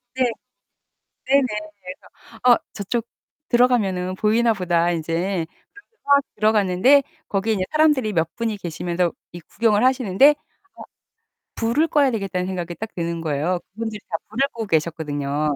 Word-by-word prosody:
네. 260 - +2 1.0
네네. 275 0 +4 0.8
그래서 225 - -17
'아 245 -1 +6 0.2
저쪽 230 +3 -3 0.4
들어가면은 205 -7 +2
보이나보다.' 195 -6 +2
이제 170 +2 -2 0.4
그래서 450 - -44
막 280 0 +6 0.2
들어갔는데 215 +5 +4 0.3
거기에 210 +2 0
이제 190 -3 -1
사람들이 295 -8 +3
몇 165 -1 -1
분이 225 -3 -2
계시면서 175 0 -2 0.2
이 175 - -9
구경을 210 +5 +1
하시는데 255 -1 +4
어 - - -4 1.2
'불을 235 +8 +1
꺼야 285 -3 +3
되겠다.'는 195 -5 -2
생각이 175 -2 -4
딱 220 +3 -7
드는 170 -1 -3
거예요. 160 +3 -1 0.2
그분들이 220 -1 -5
다 165 - -1
불을 265 +6 +1
끄고 225 -4 -6
계셨거든요. 150 -3 -1
200 Hz, 330 characters per minute, -22 LUFS, 175-235 Hz, 1.2 s, 아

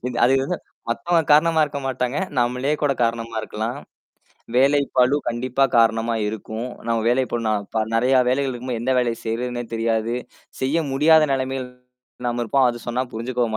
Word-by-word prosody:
இந்த 125 -1 -4
அது 130 - +3
வந்து 170 +6 -2 0.3
மத்தவங்க 170 +7 +1
காரணமா 160 +1 +5
இருக்க 140 -1 -5
மாட்டாங்க. 125 +2 -1 0.2
நம்மளே 125 +5 0
கூட 145 -1 +3
காரணமா 115 0 -1
இருக்கலாம். 115 +5 -4 0.8
வேலைப்பளு 140 -1 +3
கண்டிப்பா 125 +3 0
காரணமா 115 0 +3
இருக்கும். 110 +3 -5 0.2
நம்ம 115 -1 +1
வேலைப் 125 +1 +1
பளு 120 -1 -1
நான்ப 105 +1 -1
நெறையா 130 +3 +3
வேலைகள் 135 0 0
இருக்கும்போது. 120 -1 -4
எந்த 130 +2 +1
வேலைய 120 -2 -1
செய்யிறதுன்னே 120 +2 -3
தெரியாது. 115 0 0 0.5
செய்ய 135 +5 +1 0.2
முடியாத 155 +2 +5
நெலமையில் 130 -1 -2 0.6
நாம 120 0 -2
இருப்போம். 130 +3 +3
அது 120 - -7
சொன்னா 125 +2 0
புரிஞ்சுக்கவும் 115 -1 -2
125 Hz, 150 wpm, -22 LUFS, 115-135 Hz, 0.8 s, காரணமா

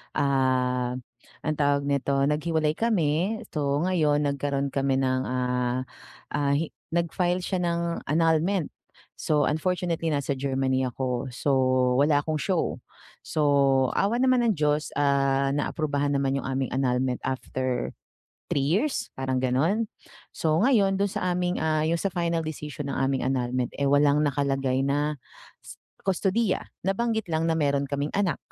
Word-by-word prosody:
Ah, 130 -2 +1 0.5
ang 155 - -1
tawag 145 0 +2
nito? 140 0 0
Nag-hiwalay 155 0 +1
kami, 195 -1 +1
so 145 -1 0
ngayon 155 -5 +2
nagkaroon 140 0 -1
kami 135 -1 +1
ng, 130 -1 +1
ah 125 0 -1 0.5
ah, 140 -1 +1
hi 155 +2 -1 0.2
nag 170 -1 0
file 180 0 0
siya 185 -1 -1
ng 170 0 -2
annulment. 165 +3 +1 0.5
So 150 -2 +1
unfortunately 165 +1 -1
nasa 140 -1 -1
Germany 130 -1 0
ako, 125 0 -3
so 140 +3 -1 0.5
wala 145 0 +4
akong 155 -1 -1
show. 185 -4 -1 0.4
So, 140 -3 +3
awa 210 +5 +1
naman 255 -1 +3
ng 225 - +3
Diyos, 150 0 +1
ah, 140 -1 +2
na-aprubahan 145 -1 -1
naman 135 -1 +1
yung - - -7
aming 135 0 -1
annulment 130 -1 0
after 130 -1 -2 0.6
3 140 - +1
years? 210 - 0
Parang 130 -1 -1
ganon? 160 - +1 0.5
So 160 0 +1
ngayon 205 -6 +3
dun 200 - +2
sa 180 -1 -1
aming, 180 0 -1
ah, 155 -1 +1
yung 165 +2 +1
sa 195 - 0
final 170 -2 0
decision 150 -2 -5
ng - - -3
aming 135 0 0
annulment, 125 -1 -1
eh, 140 - +3
walang 145 +1 +4
nakalagay 135 -2 0
na 145 +2 0 0.9
kustodiya. 195 +2 0 0.2
Nabanggit 220 +2 0
lang 160 +1 +1
na 165 - +2
meron 140 -2 +1
kaming 140 +1 -2
anak 195 -7 +1
145 Hz, 145 wpm, -26 LUFS, 135-170 Hz, 0.9 s, wala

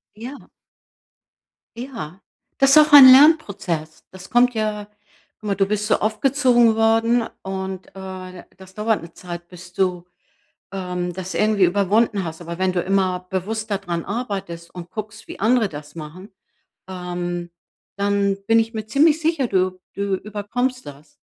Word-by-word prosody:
Ja. 245 +6 -9 1.3
Ja, 230 - -7 0.4
das 275 0 +5
auch 305 0 +6
ein 285 -2 +11
Lernprozess. 200 - +3
Das 185 0 -12
kommt 245 +1 +3
ja 215 -2 -3 0.5
guck 215 - -8
mal, 200 - 0
du 195 - +2
bist 210 +1 -2
so - - +3
aufgezogen 240 +1 +3
worden 225 +1 +2 0.2
und, 190 -1 -5
äh, 185 -1 -9
das 190 0 -15
dauert 215 0 0
'ne 165 0 -11
Zeit, 175 -1 -9
bis 180 0 -13
du, 180 -2 -1 0.7
ähm, 180 -2 -4
das 185 +1 -6
irgendwie 210 -2 +2
überwunden 200 +2 +1
hast. 160 0 -7
Aber 170 0 -7
wenn 185 -1 +1
du 180 - 0
immer 185 -1 0
bewusster 210 +3 -2
daran 175 -4 -4
arbeitest 195 -7 -5
und 175 -1 -9
guckst, 215 +2 -8
wie - - -9
andere 225 +1 +2
das 150 -2 -10
machen, 170 +5 -10 0.6
ähm, 175 -1 -5 0.5
dann 200 0 +1
bin 225 +1 +4
ich 225 +1 0
mir 220 -1 -5
ziemlich 300 +7 +3
sicher, 320 -4 0
du 185 -3 0 0.2
du 200 -1 -1
überkommst 215 +6 -3
das. 145 +1 -13
200 Hz, 150 wpm, -21 LUFS, 180-225 Hz, 1.3 s, ein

